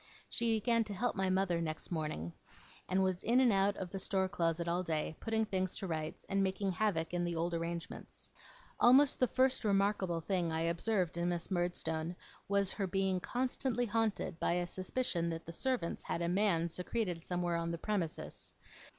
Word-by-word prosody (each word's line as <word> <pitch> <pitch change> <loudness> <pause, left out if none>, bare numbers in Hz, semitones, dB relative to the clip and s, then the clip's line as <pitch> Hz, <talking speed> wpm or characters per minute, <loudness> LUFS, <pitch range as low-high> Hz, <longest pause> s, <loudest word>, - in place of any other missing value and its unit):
She 230 -1 +1
began 230 +1 +2
to 205 - -5
'help' 245 +5 0
my 190 -2 +1
mother 185 -2 +1
next 155 +1 -4
morning, 150 - -3 0.6
and 190 +1 +3
was 185 -1 0
in 240 +3 +3
and 250 -4 +5
out 195 +1 +2
of 180 -2 -5
the 195 - -4
store 190 0 +1
closet 170 -3 0
all 175 +2 +1
day, 160 -2 -2
putting 220 -1 0
things 185 -3 -1
to - - -3
rights, 160 -3 -4
and 195 0 +1
making 195 0 0
havoc 180 -4 0
in 175 0 0
the 175 -1 -1
old 170 +1 -1
arrangements. 170 0 -5 0.5
Almost 265 +3 +6
the 255 - +4
first 260 +2 +2
remarkable 195 -4 +2
thing 175 -1 0
I 160 0 0
observed 170 +1 0
in 175 +1 +1
Miss 175 +2 -2
Murdstone 175 -2 -1 0.3
was, 200 -1 +2
her 195 -2 -1
being 190 0 +1
constantly 250 +2 -1
haunted 220 -6 -1
by - - +2
a 175 0 +1
suspicion 185 -1 -1
that 165 0 -4
the 165 - -7
servants 245 -4 -1
had 170 - -2
a - - +1
man 175 -2 +2
secreted 180 0 -2
somewhere 175 -1 0
on 170 0 -2
the 170 - -2
premises. 180 -3 -3
185 Hz, 185 wpm, -34 LUFS, 170-205 Hz, 0.6 s, Almost